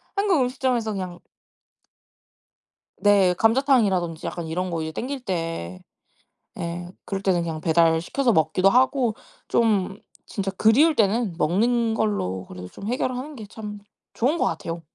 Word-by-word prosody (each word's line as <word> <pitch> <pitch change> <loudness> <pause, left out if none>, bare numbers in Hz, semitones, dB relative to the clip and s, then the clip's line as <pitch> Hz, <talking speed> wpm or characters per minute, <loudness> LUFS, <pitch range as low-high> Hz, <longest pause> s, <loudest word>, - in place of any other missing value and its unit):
한국 395 -7 +2
음식점에서 250 -3 0
그냥 185 -3 -5 1.8
네. 195 -3 +4
감자탕이라든지 225 - +2
약간 170 -2 -4
이런 180 +2 -2
거 165 - -2
이제 160 0 -4
당길 265 - -4
때 165 - -3 0.8
예. 175 +1 -4 0.2
그럴 195 -1 -3
때는 185 -3 +2
그냥 160 -2 -4
배달시켜서 170 - +2
먹기도 160 +4 +3
하고. 250 0 +2 0.3
좀 205 -4 +1 0.3
진짜 195 -2 -3
그리울 255 - +4
때는 210 -3 +1
먹는 225 +7 +2
걸로 95 - -1
그래도 90 0 -9
좀 200 - -9
해결하는 255 +4 -2
게 220 -4 -8
참 210 -1 -8 0.3
좋은 275 +8 +1
것 - - +1
같아요. 165 +1 -3
200 Hz, 290 characters per minute, -24 LUFS, 170-240 Hz, 1.8 s, 네